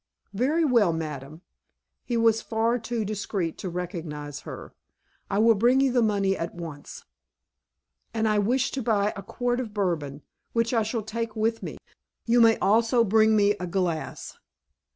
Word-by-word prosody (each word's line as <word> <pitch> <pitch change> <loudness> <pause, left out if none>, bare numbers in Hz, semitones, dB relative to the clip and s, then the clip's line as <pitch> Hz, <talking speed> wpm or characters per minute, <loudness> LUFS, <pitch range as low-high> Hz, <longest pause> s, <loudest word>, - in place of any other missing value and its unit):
"Very 290 +10 +1
well, 235 - +4
madame." 155 0 -6 0.6
(He 240 - -2
was 225 -1 +3
far 230 +2 0
too 225 -1 -3
discreet 200 -4 -3
to 190 - -4
recognize 160 -5 -5
her.) - - -9 0.6
"I 195 - -1
will 225 +2 +6
bring 240 +5 +3
you 270 -1 +3
the 245 -1 +2
money 200 -3 +1
at 165 -1 -5
once." 160 -4 -9 1.1
"And 225 -1 0
I 210 -1 +2
wish 245 +6 +1
to 270 - -3
buy 210 -3 +1
a 200 - -6
quart 245 +5 -2
of 220 -4 -5
Bourbon, 155 -8 -2 0.3
which 230 +1 +1
I 230 - +3
shall 220 +1 -2
take 230 +1 -4
with 225 +1 0
me. - - -6 0.5
You 240 +1 +4
may 225 -1 +6
also 230 +3 +3
bring 220 +1 +4
me 205 -1 +4
a 180 - -4
glass." 170 -3 -3
215 Hz, 165 wpm, -26 LUFS, 180-230 Hz, 1.1 s, will